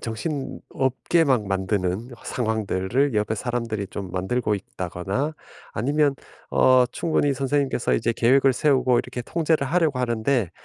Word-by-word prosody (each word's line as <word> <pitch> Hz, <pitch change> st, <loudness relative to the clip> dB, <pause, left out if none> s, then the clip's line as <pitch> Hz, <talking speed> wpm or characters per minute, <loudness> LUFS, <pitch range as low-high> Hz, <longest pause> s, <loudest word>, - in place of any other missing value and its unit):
정신없게 135 Hz, +4 st, -1 dB
막 125 Hz, -7 st, +2 dB
만드는 95 Hz, +3 st, -1 dB
상황들을 110 Hz, +3 st, 0 dB
옆에 105 Hz, +1 st, +1 dB
사람들이 115 Hz, -3 st, -3 dB
좀 95 Hz, -1 st, -7 dB
만들고 105 Hz, +5 st, -1 dB
있다거나 95 Hz, -, -3 dB, 0.4 s
아니면 145 Hz, +5 st, +1 dB, 0.4 s
어 130 Hz, -1 st, +5 dB
충분히 150 Hz, -3 st, +1 dB
선생님께서 135 Hz, -1 st, 0 dB
이제 115 Hz, +1 st, +1 dB
계획을 130 Hz, +4 st, +4 dB
세우고 130 Hz, -3 st, +3 dB
이렇게 125 Hz, -, -4 dB
통제를 160 Hz, 0 st, 0 dB
하려고 155 Hz, -3 st, +1 dB
하는데 120 Hz, -, 0 dB
125 Hz, 325 characters per minute, -24 LUFS, 105-140 Hz, 0.4 s, 어